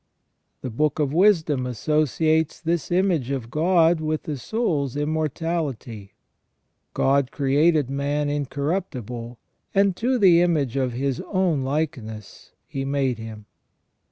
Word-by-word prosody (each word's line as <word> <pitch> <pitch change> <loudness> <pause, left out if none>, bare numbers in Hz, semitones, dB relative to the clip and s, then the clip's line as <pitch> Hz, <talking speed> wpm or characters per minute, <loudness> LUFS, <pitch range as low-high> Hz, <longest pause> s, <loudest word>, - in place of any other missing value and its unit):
The 130 - -5
Book 150 +5 0
of 145 -3 0
Wisdom 160 -8 +3
associates 155 +6 +1
this 165 -1 -2
image 175 -8 +1
of 130 -4 -4
God 165 0 +3
with 155 0 -2
the 150 - -4
soul's 145 - -1
immor 155 +1 0
tality: 135 - -4 0.4
" - - -50
God 135 -1 +2
created 145 +1 +2
man 145 +1 -1
incorruptible, 140 - -3 0.4
and 195 -1 +3
to 255 +2 +1
the 180 -6 +6
image 150 -8 +1
of 130 -3 0
his 135 +1 -2
own 185 -7 +1
likeness 130 -7 -4
He 135 - -4
made 135 -3 -1
him 110 -1 -9
145 Hz, 130 wpm, -23 LUFS, 130-165 Hz, 0.4 s, the